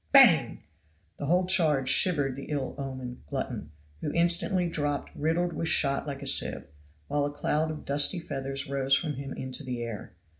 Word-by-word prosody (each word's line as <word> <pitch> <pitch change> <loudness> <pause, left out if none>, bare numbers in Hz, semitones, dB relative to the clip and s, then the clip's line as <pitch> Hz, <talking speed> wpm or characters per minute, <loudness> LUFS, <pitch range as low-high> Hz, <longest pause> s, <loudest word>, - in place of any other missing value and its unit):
Bang! - - +6 0.5
the 145 - -5
whole 180 +3 +2
charge 155 -7 +3
shivered 145 -7 +3
the 140 - -8
ill 140 -4 -3
omened 130 -2 -6
glutton, 75 0 -5 0.3
who 150 - -3
instantly 175 +2 +3
dropped 145 -3 -2
riddled 165 +3 0
with 165 - -3
shot 140 -2 +1
like 140 0 -5
a - - -6
sieve, - - +2 0.4
while 145 -1 0
a 145 - -3
cloud 150 +2 -1
of 155 -1 -7
dusky 145 +6 +3
feathers 135 -3 -5
rose 135 0 +1
from 155 0 -2
him 140 0 -7
into 130 +3 -5
the 125 -3 -4
air. 115 -4 -7
145 Hz, 175 wpm, -28 LUFS, 135-160 Hz, 0.5 s, Bang